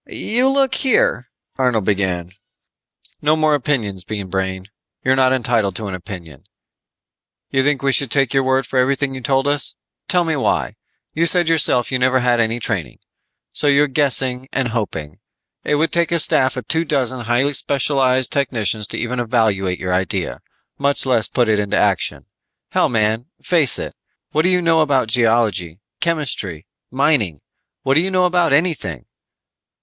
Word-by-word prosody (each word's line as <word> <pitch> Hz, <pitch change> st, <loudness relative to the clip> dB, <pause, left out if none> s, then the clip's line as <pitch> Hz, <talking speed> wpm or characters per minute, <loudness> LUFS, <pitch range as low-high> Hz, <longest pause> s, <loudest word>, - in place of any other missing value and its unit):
"You 245 Hz, +4 st, 0 dB
look 270 Hz, -1 st, +1 dB
here 230 Hz, -, +1 dB
" -, -, -45 dB
Arnold 125 Hz, -6 st, +1 dB
began. 95 Hz, -4 st, -1 dB, 0.9 s
"No 150 Hz, +1 st, +3 dB
more 155 Hz, -1 st, +2 dB
opinions, 120 Hz, -10 st, -1 dB
Bean 100 Hz, -2 st, -6 dB
Brain. 95 Hz, 0 st, -3 dB, 0.4 s
You're 130 Hz, +1 st, +3 dB
not 130 Hz, -1 st, +3 dB
entitled 115 Hz, -6 st, 0 dB
to 110 Hz, -, -2 dB
an 95 Hz, -, -5 dB
opinion. 85 Hz, -6 st, -9 dB, 1.1 s
You 135 Hz, -, +2 dB
think 145 Hz, -1 st, 0 dB
we 135 Hz, -, +2 dB
should 135 Hz, +1 st, +2 dB
take 135 Hz, -1 st, +1 dB
your 135 Hz, -, +3 dB
word 130 Hz, +1 st, +1 dB
for 130 Hz, -, -1 dB
everything 135 Hz, +1 st, +1 dB
you 130 Hz, -, -7 dB
told 135 Hz, +2 st, +1 dB
us? 145 Hz, 0 st, -1 dB, 0.3 s
Tell 180 Hz, -1 st, +2 dB
me 160 Hz, -2 st, -1 dB
why. 135 Hz, -, -1 dB, 0.4 s
You 165 Hz, +2 st, +1 dB
said 175 Hz, -1 st, +1 dB
yourself 145 Hz, -7 st, +2 dB
you 130 Hz, -, 0 dB
never 130 Hz, +1 st, +2 dB
had 120 Hz, -1 st, +2 dB
any 115 Hz, +1 st, 0 dB
training. 90 Hz, -, -3 dB, 0.6 s
So 150 Hz, -, -1 dB
you're 145 Hz, +1 st, +4 dB
guessing 130 Hz, -2 st, -1 dB
and 130 Hz, -3 st, -1 dB
hoping. 90 Hz, -10 st, -4 dB, 0.4 s
It 150 Hz, -, 0 dB
would 160 Hz, +3 st, +1 dB
take 170 Hz, 0 st, +1 dB
a 170 Hz, -, +2 dB
staff 130 Hz, -3 st, +3 dB
of 125 Hz, -, -6 dB
two 160 Hz, +1 st, +2 dB
dozen 130 Hz, -6 st, -1 dB
highly 125 Hz, +5 st, +1 dB
specialized 130 Hz, -2 st, +2 dB
technicians 110 Hz, -7 st, -1 dB
to -, -, -5 dB
even 120 Hz, +1 st, -3 dB
evaluate 110 Hz, -6 st, 0 dB
your 90 Hz, -1 st, -3 dB
idea, 90 Hz, -1 st, -2 dB, 0.4 s
much 140 Hz, 0 st, 0 dB
less 120 Hz, -4 st, +2 dB
put 120 Hz, -2 st, 0 dB
it 110 Hz, -1 st, +2 dB
into 100 Hz, -1 st, -1 dB
action. -, -, 0 dB, 0.5 s
Hell, -, -, +2 dB
man, 110 Hz, +1 st, 0 dB
face 160 Hz, -, +3 dB
it. -, -, -5 dB, 0.4 s
What 155 Hz, -, +2 dB
do 180 Hz, -, +2 dB
you 180 Hz, -1 st, +1 dB
know 165 Hz, -1 st, +3 dB
about 135 Hz, -6 st, +1 dB
geology, 110 Hz, -8 st, +1 dB, 0.2 s
chemistry, 140 Hz, -, -2 dB, 0.2 s
mining? 125 Hz, -, +1 dB, 0.4 s
What 135 Hz, -, +2 dB
do 155 Hz, -, +4 dB
you 190 Hz, -, -2 dB
know 185 Hz, -1 st, +2 dB
about 175 Hz, -3 st, +2 dB
anything?" 140 Hz, -, 0 dB
130 Hz, 170 wpm, -19 LUFS, 110-145 Hz, 1.1 s, you're